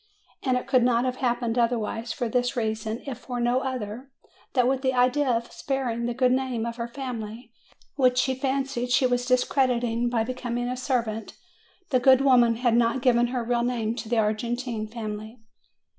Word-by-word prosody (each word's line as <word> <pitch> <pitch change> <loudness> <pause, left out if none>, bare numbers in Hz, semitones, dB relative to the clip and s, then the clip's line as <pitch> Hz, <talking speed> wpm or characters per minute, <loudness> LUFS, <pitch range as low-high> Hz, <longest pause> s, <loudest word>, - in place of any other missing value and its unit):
And 255 -2 +1
it 250 - -4
could 255 -1 +3
not 240 0 +2
have 255 0 -2
happened 240 -2 0
otherwise, 230 -1 -1
for 245 - -2
this 245 +2 0
reason 220 0 -2
if 265 -4 -5
for 245 0 -5
no 240 +1 +2
other: 255 -1 -5 0.4
that 250 -2 +3
with 265 0 +1
the 260 -1 0
idea 255 +3 +3
of 235 -1 -1
sparing 245 -4 -2
the 240 - -3
good 255 0 +3
name 255 -3 0
of 235 0 -5
her 235 0 -3
family, 235 -2 -7 0.4
which 255 -2 +3
she 260 +1 +2
fancied 265 -2 -2
she 255 +2 +3
was 245 0 0
discrediting 245 -2 +1
by 235 -2 +1
becoming 245 0 -3
a 250 - -2
servant, 235 -4 -2 0.5
the 255 - +4
good 260 +1 +6
woman 245 -4 +5
had 240 0 +1
not 240 +2 +2
given 240 -2 +4
her 245 -1 -2
real 240 0 0
name 235 -2 -1
to 225 - -6
the 235 - +1
Argentine 225 +1 -1
family. 215 0 -6
245 Hz, 185 wpm, -26 LUFS, 230-255 Hz, 0.5 s, good